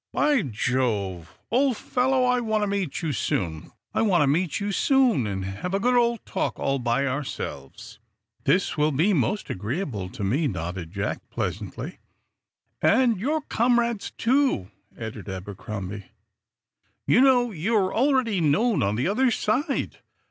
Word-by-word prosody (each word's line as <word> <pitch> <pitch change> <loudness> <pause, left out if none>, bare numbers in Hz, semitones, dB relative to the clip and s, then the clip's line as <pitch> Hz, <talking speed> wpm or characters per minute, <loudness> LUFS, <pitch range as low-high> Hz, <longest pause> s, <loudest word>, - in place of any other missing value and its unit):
"By 295 -4 +3
Jove, 105 - -2
old 255 0 +2
fellow, 260 +1 +1
I 250 0 +3
want 220 -3 0
to - - 0
meet 195 -6 -2
you 160 - 0
soon 85 - -2 0.2
and 180 - +2
have 100 - -3
a - - +1
good 250 +4 +2
old 235 -1 +2
talk - - -2
all 135 0 0
by 120 +3 +1
ourselves." 130 - -5 0.5
"That 185 -3 +2
will 150 +1 +3
be 165 +9 +2
most 175 - 0
agreeable 105 - -3
to 100 - -7
me," 135 +11 +1
nodded 90 - -4
Jack, 100 +1 -4
pleasantly. - - -4 0.8
"And 235 -3 +3
your 300 +9 0
comrades, 235 -4 +1
too," 250 - +1 0.3
added 110 -3 -7
Abercrombie. 95 +1 -6 1.0
"You 245 - +4
know, 250 -3 +4
you're 190 +2 0
already 245 -6 +2
known 200 +10 +2
on 100 +2 +1
the 125 +7 0
other 250 +7 +2
side. 265 +6 -1
180 Hz, 130 wpm, -25 LUFS, -, 1.0 s, You